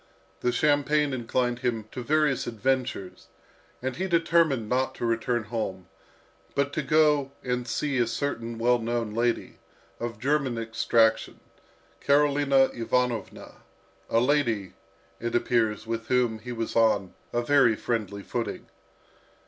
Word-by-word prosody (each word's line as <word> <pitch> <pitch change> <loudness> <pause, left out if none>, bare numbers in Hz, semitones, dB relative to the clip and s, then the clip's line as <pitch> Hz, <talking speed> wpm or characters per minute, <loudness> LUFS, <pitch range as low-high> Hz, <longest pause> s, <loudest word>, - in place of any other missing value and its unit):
The 125 - +1
champagne 145 0 +2
inclined 120 0 -1
him 120 -4 -2
to 125 - -5
various 145 -1 +1
adventures, 120 -4 -2 0.6
and 130 -1 -3
he 190 +2 -1
determined 165 - +2
not 130 +3 0
to - - -3
return 115 +1 0
home, 100 -5 -4 0.7
but 140 0 0
to - - 0
go 150 -1 +3
and 125 -1 -2
see 140 +2 -1
a 120 - +2
certain 115 -2 -3
well 120 +1 +3
known 115 -2 -2
lady, 120 +1 -1 0.4
of 120 -2 -4
German 135 0 0
extraction, 115 0 +1 0.6
Karolina 140 -1 +3
Ivanovna, 120 -2 -2 0.5
a 115 - +3
lady, 120 -7 +1 0.5
it 120 0 -3
appears, 115 -3 +1
with 115 0 -4
whom 120 -3 +1
he 125 +3 -8
was 115 -1 -4
on 105 -5 +2 0.2
a 120 - 0
very 135 -3 +4
friendly 105 -4 -3
footing. 120 +2 -4
120 Hz, 130 wpm, -27 LUFS, 115-140 Hz, 0.7 s, very